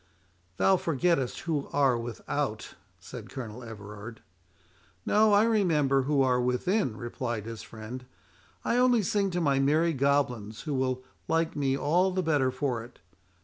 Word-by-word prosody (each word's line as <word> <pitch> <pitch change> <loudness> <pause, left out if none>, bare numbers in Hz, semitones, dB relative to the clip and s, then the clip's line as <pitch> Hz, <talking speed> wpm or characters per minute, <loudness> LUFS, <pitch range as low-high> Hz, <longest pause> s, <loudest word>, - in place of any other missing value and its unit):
— 90 +1 -39
"Thou 190 -1 +4
forgettest 165 -4 0
who 155 -5 -2
are 135 -3 +3
without," 115 0 -4 0.3
said 110 +5 -9
Colonel 125 -3 -7
Everard. 105 0 -9 0.8
"No—I 210 -1 +5
remember 160 -12 +3
who 140 +1 +2
are 125 -1 +2
within," 125 - 0
replied 120 -2 -4
his 115 -2 -7
friend. 115 +2 -9 0.6
"I 235 - +2
only 250 -3 +4
sing 200 +1 +1
to 175 -1 -2
my 140 -5 +2
merry 155 +5 +3
goblins, 125 -6 0
who 150 - -4
will 130 -1 -1 0.2
like 165 0 0
me 135 -2 +1
all 175 +7 +2
the 185 0 -1
better 145 -5 +2
for 125 -3 -2
it. 120 +1 -14
135 Hz, 145 wpm, -28 LUFS, 120-165 Hz, 0.8 s, No—I